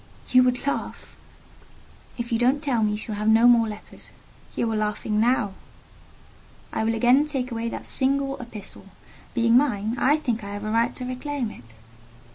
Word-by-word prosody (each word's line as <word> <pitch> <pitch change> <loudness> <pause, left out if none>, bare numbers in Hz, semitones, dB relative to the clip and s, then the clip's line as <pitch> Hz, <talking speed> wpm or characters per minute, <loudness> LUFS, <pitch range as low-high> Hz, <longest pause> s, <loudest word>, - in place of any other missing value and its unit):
"You 255 - +7
would 250 0 +1
laugh—?" 280 - -4 1.0
"If 235 0 -5
you 230 - +1
don't 260 +5 +2
tell 255 -6 +1
me 215 - +2
you - - -2
shall 215 0 -4
have 210 +1 -3
no 225 +2 +6
more 235 -2 +5
letters." 210 -1 -9 0.5
"You 230 - 0
are - - -1
laughing 210 0 -1
now." 230 -3 +2 1.2
"I - - -1
will 225 +1 +1
again 250 +6 +4
take 265 -4 -3
away 230 0 -2
that - - -7
single 275 +1 0
epistle: 215 -4 -10 0.5
being 230 -1 +3
mine, 235 -5 +2
I 290 +4 +4
think 240 -8 -2
I 200 0 -6
have 205 - -6
a 215 - -2
right 230 +1 +1
to 255 - -6
reclaim 255 -1 -3
it." 115 - -15
235 Hz, 180 wpm, -24 LUFS, 215-255 Hz, 1.2 s, You